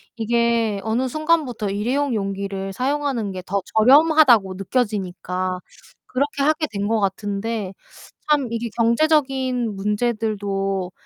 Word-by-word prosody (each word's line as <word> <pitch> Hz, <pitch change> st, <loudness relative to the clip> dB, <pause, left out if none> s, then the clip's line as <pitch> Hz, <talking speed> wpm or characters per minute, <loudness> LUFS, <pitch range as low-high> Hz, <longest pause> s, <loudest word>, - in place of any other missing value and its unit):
이게 230 Hz, -2 st, +1 dB
어느 230 Hz, +4 st, 0 dB
순간부터 300 Hz, -7 st, 0 dB
일회용 245 Hz, +7 st, -1 dB
용기를 195 Hz, -1 st, -3 dB
사용하는 265 Hz, -4 st, -1 dB
게 185 Hz, -1 st, -7 dB
더 200 Hz, +1 st, -1 dB
저렴하다고 255 Hz, -, +5 dB
느껴지니까 185 Hz, -4 st, -2 dB, 0.5 s
그렇게 280 Hz, +2 st, -1 dB
하게 310 Hz, +2 st, +2 dB
된 200 Hz, 0 st, -2 dB
것 225 Hz, 0 st, +1 dB
같은데 205 Hz, +1 st, -2 dB, 0.6 s
참 285 Hz, -4 st, +3 dB
이게 230 Hz, 0 st, -3 dB
경제적인 260 Hz, -2 st, +1 dB
문제들도 205 Hz, -3 st, -1 dB
225 Hz, 275 characters per minute, -22 LUFS, 195-260 Hz, 0.6 s, 저렴하다고